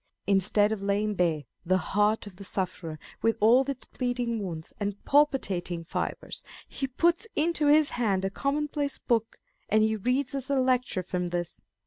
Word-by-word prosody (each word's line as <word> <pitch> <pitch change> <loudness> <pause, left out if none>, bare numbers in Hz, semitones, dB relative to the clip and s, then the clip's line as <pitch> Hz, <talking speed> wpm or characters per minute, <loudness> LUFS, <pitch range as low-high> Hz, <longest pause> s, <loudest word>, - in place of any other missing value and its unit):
Instead 205 +2 +3
of 220 -3 -2
laying 205 +2 0
bare 170 -6 +1 0.2
the 185 +1 +2
heart 210 +4 +1
of 195 -3 -11
the 200 - -9
sufferer 180 -5 -3 0.2
with 225 0 +2
all 230 +5 +6
its 270 -2 -4
bleeding 245 -3 -2
wounds 165 -4 -6
and 205 -1 -4
palpitating 200 - +2
fibres, 165 - -3 0.3
he 270 - -3
puts 340 - +1
into 310 -1 +1
his 300 0 +5
hand 200 -6 0
a 195 - -1
commonplace 290 +2 -1
book, 225 -2 0 0.3
and 215 +1 +4
he 220 0 +2
reads 250 +6 0
us 270 -1 -4
a 280 -1 +2
lecture 255 -7 +1
from 180 0 -2
this. 175 -1 -4
215 Hz, 165 wpm, -28 LUFS, 190-265 Hz, 0.3 s, all